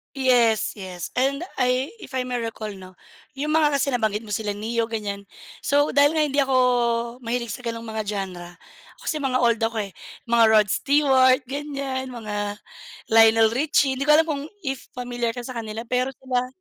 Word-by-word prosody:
Yes, 245 Hz, -5 st, +3 dB
yes 185 Hz, -4 st, -7 dB
and 275 Hz, +5 st, +1 dB, 0.2 s
I 255 Hz, +5 st, +1 dB
if 265 Hz, -, -9 dB
I 255 Hz, -, 0 dB
may 250 Hz, -1 st, -3 dB
recall 225 Hz, -2 st, -5 dB
'no, 185 Hz, -2 st, -12 dB, 0.4 s
yung 295 Hz, +3 st, -2 dB
mga 305 Hz, -2 st, +3 dB
kasi 275 Hz, 0 st, +1 dB
nabanggit 220 Hz, -2 st, 0 dB
mo 210 Hz, -, -10 dB
sila 205 Hz, -1 st, -2 dB
Ne-yo 225 Hz, +2 st, -1 dB
ganyan, 205 Hz, -3 st, -5 dB, 0.3 s
so, 290 Hz, +1 st, +2 dB
dahil 285 Hz, +2 st, +4 dB
nga 310 Hz, -, +3 dB
hindi 285 Hz, -1 st, 0 dB
ako 270 Hz, -1 st, +2 dB, 0.6 s
mahilig 235 Hz, -1 st, -3 dB
sa -, -, -6 dB
ganong 230 Hz, 0 st, -4 dB
mga 220 Hz, -1 st, -4 dB
genre 185 Hz, -4 st, -5 dB, 0.5 s
kasi 310 Hz, -, -3 dB
mga 260 Hz, -2 st, +1 dB
old 235 Hz, -2 st, +3 dB
ako 225 Hz, 0 st, 0 dB
eh, 195 Hz, -, -9 dB, 0.3 s
mga 235 Hz, -1 st, +4 dB
Rod 215 Hz, -1 st, +5 dB
Stewart 270 Hz, -2 st, +4 dB
ganyan, 275 Hz, -1 st, -4 dB
mga 210 Hz, -4 st, -4 dB, 0.6 s
Lionel 225 Hz, 0 st, +6 dB
Richie 275 Hz, +1 st, +2 dB
hindi 275 Hz, +2 st, -3 dB
ko 300 Hz, -, +7 dB
alam 320 Hz, +1 st, +5 dB
kung 290 Hz, -3 st, -3 dB, 0.2 s
if 270 Hz, -3 st, -4 dB
familiar 245 Hz, -1 st, -3 dB
ka 245 Hz, -, -5 dB
sa 255 Hz, -, -7 dB
kanila 220 Hz, 0 st, -5 dB
pero 250 Hz, +2 st, 0 dB
sila. 255 Hz, -1 st, -2 dB
245 Hz, 180 wpm, -23 LUFS, 220-270 Hz, 0.6 s, ko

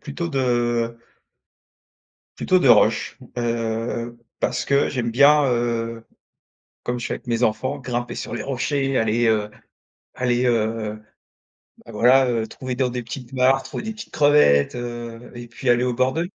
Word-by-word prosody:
plutôt 165 Hz, +4 st, -5 dB
de 120 Hz, -4 st, 0 dB, 1.4 s
plutôt 185 Hz, 0 st, +2 dB
de 135 Hz, -, +3 dB
roches, 115 Hz, +1 st, +3 dB, 0.2 s
heu, 115 Hz, 0 st, -2 dB, 0.2 s
parce -, -, -1 dB
que 140 Hz, 0 st, +2 dB
j'aime 120 Hz, -4 st, -2 dB
bien, 145 Hz, +4 st, +5 dB
heu, 115 Hz, -2 st, -1 dB, 0.8 s
comme 120 Hz, 0 st, -3 dB
je 120 Hz, -, -4 dB
fais -, -, -2 dB
avec -, -, -11 dB
mes 115 Hz, 0 st, -1 dB
enfants, 130 Hz, +6 st, 0 dB
grimper 120 Hz, -2 st, -4 dB
sur -, -, -5 dB
les 110 Hz, -, -4 dB
rochers, 135 Hz, +1 st, -1 dB
aller, 115 Hz, +1 st, +1 dB
heu 105 Hz, -2 st, +1 dB, 0.7 s
aller, 125 Hz, 0 st, 0 dB
heu, 110 Hz, -2 st, -1 dB, 0.9 s
voilà, 125 Hz, +4 st, +4 dB
heu, 115 Hz, -2 st, 0 dB
trouver 130 Hz, +1 st, -6 dB
dans 130 Hz, 0 st, 0 dB
des 125 Hz, 0 st, -4 dB
petites 120 Hz, +2 st, -9 dB
martres 130 Hz, +1 st, +2 dB
ou -, -, -2 dB
des 220 Hz, +1 st, -5 dB
petites 220 Hz, -, -11 dB
crevettes, 145 Hz, -, +4 dB
heu, 120 Hz, -1 st, -7 dB
et 120 Hz, 0 st, -9 dB
puis 120 Hz, +2 st, -4 dB
aller 120 Hz, 0 st, +4 dB
au 125 Hz, -1 st, 0 dB
bord 130 Hz, +1 st, +1 dB
de 160 Hz, -, -1 dB
mer, 175 Hz, -, -3 dB
120 Hz, 160 wpm, -22 LUFS, 115-130 Hz, 1.4 s, bien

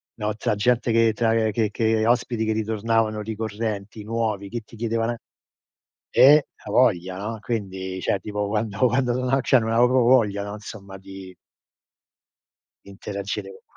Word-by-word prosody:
no, 105 Hz, -1 st, -3 dB
tra 115 Hz, 0 st, -1 dB
gente 120 Hz, +3 st, +1 dB
che 115 Hz, 0 st, +4 dB
tra 115 Hz, 0 st, +1 dB
che 110 Hz, 0 st, 0 dB
che 110 Hz, 0 st, +1 dB
ospiti 120 Hz, -2 st, +1 dB
che 110 Hz, -, 0 dB
ritornavano 110 Hz, 0 st, 0 dB
ricorrenti, 110 Hz, -1 st, -4 dB
nuovi, 110 Hz, -3 st, -2 dB
che 120 Hz, +1 st, -4 dB
ti 115 Hz, -, -16 dB
chiedevano, 115 Hz, +1 st, -1 dB, 1.0 s
eh 145 Hz, +3 st, +7 dB
eh, 150 Hz, -, +1 dB, 0.2 s
avoglia, 95 Hz, -7 st, +2 dB
no. 110 Hz, +3 st, -5 dB
Quindi, 95 Hz, -5 st, -4 dB
cioè, 95 Hz, -, 0 dB
tipo 105 Hz, +1 st, -3 dB
quando 105 Hz, 0 st, -2 dB
quando 125 Hz, 0 st, +1 dB
sono 130 Hz, +2 st, 0 dB
cioè, 130 Hz, -, +4 dB
non 115 Hz, 0 st, -2 dB
avevo 120 Hz, +2 st, +4 dB
proprio 125 Hz, -1 st, +3 dB
voglia, 105 Hz, -6 st, +3 dB
no, 100 Hz, 0 st, -6 dB
insomma, 100 Hz, -2 st, -9 dB
di 95 Hz, -1 st, -11 dB, 1.5 s
interagire 100 Hz, 0 st, -5 dB, 0.2 s
con. -, -, -31 dB
110 Hz, 155 wpm, -23 LUFS, 100-115 Hz, 1.5 s, eh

